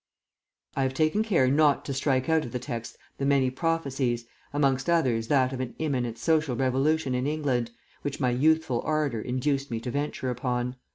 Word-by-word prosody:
I 135 - 0
have 130 0 0
taken 155 +8 +2
care 185 -12 +3
not 145 +1 +3
to 140 - -3
strike 130 -1 +1
out 160 -1 +3
of 120 - -7
the 125 - -2
text 115 -2 -6 0.2
the 135 - 0
many 135 -2 +3
prophecies, 135 -6 -1 0.3
amongst 135 0 +1
others 125 -10 +2
that 130 -1 +2
of 130 - -4
an 130 -2 -4
imminent 125 -7 -1
social 155 +1 +1
revolution 135 +3 +1
in 125 +2 0
England, 140 -6 0 0.3
which 145 - -4
my 125 -3 +2
youthful 145 -1 +2
ardour 150 -7 0
induced 135 +3 -1
me 115 -2 -2
to 125 - -4
venture 140 -2 -2
upon. 125 0 -2
135 Hz, 180 wpm, -27 LUFS, 125-150 Hz, 0.3 s, care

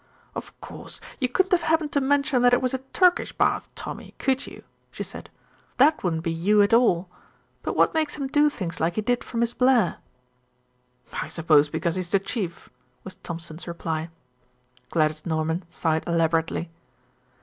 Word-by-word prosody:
"Of - - -8
course, - - -7 0.2
you 255 -3 +1
couldn't 375 +8 +1
have 360 -2 +4
happened 315 -2 +1
to 285 - +1
mention 280 -1 +2
that 245 0 +6
it - - -1
was 255 - 0
a 265 - -1
Turkish 360 -1 +3
bath, - - +1
Tommy, - - -8
could 265 0 0
you?" - - -11 0.3
she - - -6
said. - - -10 0.5
"That 300 +4 +4
wouldn't 165 -3 -1
be 165 - -1
you 200 +6 +3
at 200 - +1
all. 195 -7 +4 0.5
But - - -3
what - - +4
makes 315 -2 0
him 280 - -3
do 295 +2 +3
things 180 -11 -5
like 170 +2 0
he 215 - 0
did 245 +3 0
for 235 - -7
Miss 235 0 +1
Blair?" 250 -2 +3 1.2
"I - - -3
suppose 155 -3 +3
because 165 +2 -1
he's 180 -2 -3
the 195 - +4
Chief," 195 -3 -4 0.4
was 190 - -7
Thompson's 165 0 -8
reply. 165 -1 -3 0.8
Gladys 155 -1 +1
Norman 160 +1 -1
sighed 160 -2 -1
elaborately. 165 0 0
190 Hz, 170 wpm, -25 LUFS, 165-265 Hz, 1.2 s, that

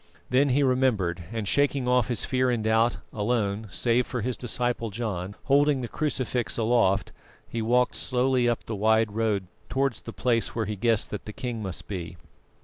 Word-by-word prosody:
Then 135 +3 +4
he 140 +3 +3
remembered, 110 -10 +1
and 110 -3 -3
shaking 140 +4 +1
off 125 -1 +3
his 120 -4 0
fear 130 -1 +1
and 120 -3 0
doubt, 115 +2 +2 0.2
alone, 105 -1 -1
save 120 +5 +1
for 125 - -3
his 125 +2 -1
disciple 120 -1 -2
John, 100 -3 -4
holding 140 0 +3
the 120 - -3
crucifix 130 -4 -1
aloft, 110 -4 +2 0.4
he 115 - -3
walked 125 +3 +2
slowly 125 -1 +1
up 120 - -2
the 110 - -4
wide 110 +1 +3
road 105 -3 0 0.2
towards 135 -2 0
the 115 - -8
place 115 -1 0
where 115 -2 0
he 105 +1 -3
guessed 115 +1 +1
that 105 - -5
the 105 - -6
king 120 -2 -4
must 95 -4 -5
be. 90 -3 -5
115 Hz, 180 wpm, -26 LUFS, 105-125 Hz, 0.4 s, Then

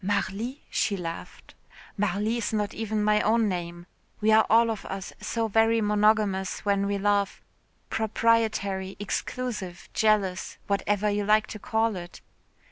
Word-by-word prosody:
"Marly?" 205 +7 -2
she 205 -2 0
laughed. 170 -2 -7 0.4
"Marly 205 +2 0
is 230 - -2
not 210 -2 -1
even 215 -1 -2
my 210 0 +3
own 225 0 +3
name. 175 -2 -4 0.3
We 220 +1 +3
are 220 0 +5
all 230 +1 +5
of 215 - -5
us 195 -1 -6
so 230 -1 -1
very 225 +2 +3
monogamous 210 -2 +2
when 200 -1 +1
we 200 0 0
love, 200 0 +1 0.5
proprietary, 215 -4 +1
exclusive, 205 -3 -4
jealous, 205 -4 +1
whatever 205 +1 0
you 205 0 0
like 215 +1 +4
to 215 - -8
call 220 0 0
it. 175 -1 -8
210 Hz, 140 wpm, -27 LUFS, 195-220 Hz, 0.5 s, are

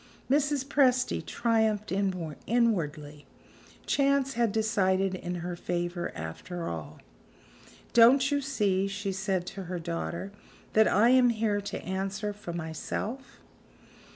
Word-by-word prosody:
Mrs. 285 -1 +2
Presty 255 -3 +2
triumphed 220 -3 0
inwardly; 170 - -1 0.6
chance 275 -1 +2
had 235 -3 +1
decided 195 -3 +1
in 180 -1 -4
her 175 0 -3
favor, 175 0 -3
after 165 - -6
all! 75 -2 -6 1.0
"Don't 260 +4 +6
you 285 0 +1
see," 205 -8 +1
she 195 0 -3
said 190 -2 -1
to 195 +1 -7
her 180 +1 -4
daughter, 170 +2 -4 0.4
"that 220 0 +5
I 215 +5 +4
am 255 -1 +6
here 215 -3 0
to 200 - -5
answer 195 +3 -3
for 200 -4 -8
myself?" 175 - -5
200 Hz, 120 wpm, -29 LUFS, 175-235 Hz, 1.0 s, Don't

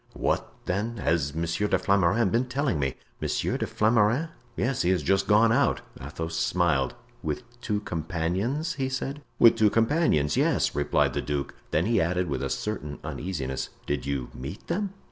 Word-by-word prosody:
"What, - - 0
then, 105 +6 -1
has 80 -3 0
Monsieur 85 +5 0
de 95 - +3
Flamarens 100 +2 +3
been 120 +5 +2
telling 130 - 0
me?" 70 -2 -1 0.3
"Monsieur - - -1
de - - -1
Flamarens?" 115 +7 +2 0.3
"Yes, 125 +1 0
he 85 - +2
has 95 -1 +2
just 95 0 +2
gone 110 +2 +5
out." 140 +4 +2 0.2
Athos 80 +4 -5
smiled. 80 -5 +1 0.3
"With 75 +9 -3 0.2
two 105 -3 -1
companions?" 90 - -1
he 135 -2 -2
said. 135 +2 -3 0.2
"With 115 - +7
two 110 -2 +5
companions, 115 - +2
yes," - - +2
replied - - +2
the - - -1
duke. 70 -1 -3 0.2
Then 80 - +1
he 115 +1 +3
added 90 +1 0
with 70 - -2
a - - -2
certain 75 -9 -3
uneasiness, 75 -8 -3 0.2
"Did 70 -2 -2
you 70 -3 -2
meet 70 +9 -7
them?" 195 +3 -1
95 Hz, 170 wpm, -27 LUFS, 80-115 Hz, 0.3 s, With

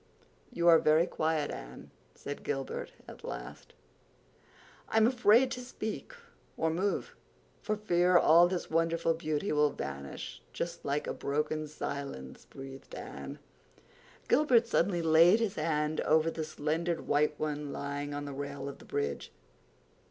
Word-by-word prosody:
"You 170 -8 0
are 165 -1 +8
very 155 +2 +4
quiet, 155 -3 -1
Anne," 60 +1 -9 0.2
said 145 - -7
Gilbert 135 -2 -4 0.2
at - - -12
last. - - -8 1.1
"I'm 220 0 +4
afraid 245 0 +4
to - - -3
speak 245 - -6 0.4
or 160 0 +1
move 190 +5 -1 0.5
for 215 - -1
fear 180 -4 +3
all 170 +1 +7
this 180 -1 -3
wonderful 165 0 +1
beauty 155 +2 -2
will 150 0 +4
vanish 70 - -6
just 170 0 -4
like 145 +1 -1
a - - -3
broken 150 +2 -2
silence," 140 - -6
breathed 135 0 -10
Anne. - - -7 0.9
Gilbert 250 -6 +4
suddenly 180 -6 +1
laid 165 +6 +6
his 225 -4 0
hand 155 -4 0
over 160 +1 +3
the 160 - -3
slender 160 +3 -1
white 150 +1 +1
one 150 -1 -3
lying 145 +1 -4
on 145 0 -4
the 140 - -6
rail 140 0 -5
of 140 - -7
the - - -14
bridge. 70 0 -3
155 Hz, 140 wpm, -31 LUFS, 145-175 Hz, 1.1 s, are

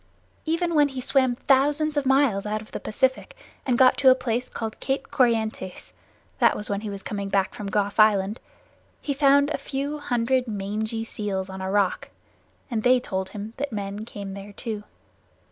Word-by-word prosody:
Even 335 +2 0
when 295 -2 +5
he 265 -2 -6
swam 260 -1 +2
thousands 290 +4 +2
of 285 -2 0
miles 265 -7 +3
out 215 +1 -1
of 215 - -13
the - - -4
Pacific 260 - -1 0.3
and 245 -2 +2
got 255 0 +6
to 270 -2 +7
a 255 - +7
place 250 -1 -2
called 220 -1 -5
Cape 270 0 -2
Corrientes 220 - 0 0.5
(that - - +4
was 210 - -4
when 200 0 -1
he 215 - -5
was 200 -1 -7
coming 200 -6 -4
back 195 -1 +1
from 205 - -6
Gough's 205 +1 -1
Island), 210 0 +4 0.6
he 285 - -2
found 280 +1 +4
a - - -1
few 285 +2 -3
hundred 250 -1 0
mangy 215 +2 -3
seals 195 -4 -3
on 190 0 -7
a 190 - -3
rock 200 -2 +1 0.6
and 225 -2 0
they 250 +2 +5
told 190 -5 -3
him 210 +3 -7
that 285 0 -3
men 205 0 -4
came 200 -3 -7
there 200 +1 -9
too. 210 -1 -5
225 Hz, 185 wpm, -25 LUFS, 205-270 Hz, 0.6 s, to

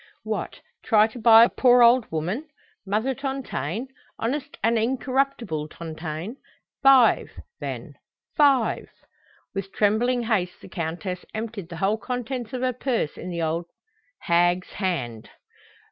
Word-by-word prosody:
What, - - -4 0.2
try 215 -3 +5
to 225 +2 -7
bribe 225 +1 +7
a - - -15
poor 245 -1 +7
old 240 0 +5
woman, 180 - -3 0.4
Mother 220 +7 0
Tontaine, 265 - -4 0.3
honest 275 +4 -3
and 230 +1 +3
incorruptible 250 - -1
Tontaine? 160 - -6 0.4
Five, 270 -3 +5 0.3
then, - - -6 0.4
five!" 275 -5 +3 0.6
With 195 -1 -4
trembling 235 +5 +2
haste 190 -6 -1
the - - -13
Countess 175 +2 -4
emptied 220 -5 -5
the 170 - -7
whole 200 +5 +1
contents 245 -1 -4
of 255 - -4
her 255 -1 +1
purse 240 - -1
in 180 - -7
the 170 -2 -3
old 165 +2 -1 0.5
hag's 175 +1 +2
hand. 135 - -3
220 Hz, 130 wpm, -24 LUFS, 175-250 Hz, 0.6 s, bribe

